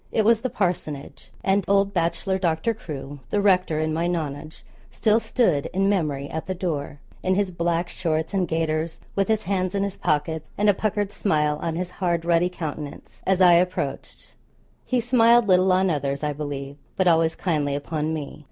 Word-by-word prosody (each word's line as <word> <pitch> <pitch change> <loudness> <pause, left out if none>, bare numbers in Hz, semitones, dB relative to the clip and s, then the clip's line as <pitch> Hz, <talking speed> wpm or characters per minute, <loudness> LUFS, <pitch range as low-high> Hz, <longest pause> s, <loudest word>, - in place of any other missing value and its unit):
It 220 - +1
was 230 0 +4
the 255 - -1
parsonage, 170 -9 -3
and 195 +1 +2
old 200 0 +3
bachelor 175 +2 0
Doctor 170 +5 0
Crewe, 145 -8 -8
the 205 - +1
rector, 185 -5 +3
in 155 0 0
my 165 +2 0
nonage, 155 -3 -4 0.2
still 220 0 +2
stood, 180 - +1
in 195 +1 +2
memory, 150 -8 0
at 160 +2 -5
the 190 - -2
door, 150 -6 -3 0.2
in 185 0 +1
his 200 -1 0
black 170 0 0
shorts 160 0 -2
and 190 -3 +1
gaiters, 160 0 -1 0.2
with 195 -1 +1
his 220 -1 +1
hands 185 0 -1
in 200 - +1
his 200 -1 -3
pockets, 155 +1 -1
and 210 +1 +3
a - - +6
puckered 205 0 -1
smile 150 -6 0
on 165 -1 -2
his 180 +1 -3
hard 170 -2 0
ruddy 170 +1 +3
countenance, 150 -4 -7
as 190 0 +2
I 180 -1 +8
approached. 180 +2 -1 0.5
He 255 - +1
smiled 235 -1 +4
little 185 0 +4
on 185 0 +3
others 140 -1 -2
I 150 0 0
believe, 140 -1 -5 0.2
but 190 - +1
always 165 -2 +3
kindly 150 -6 -1
upon 150 +2 -2
me. 155 -2 -5
175 Hz, 185 wpm, -24 LUFS, 155-195 Hz, 0.5 s, I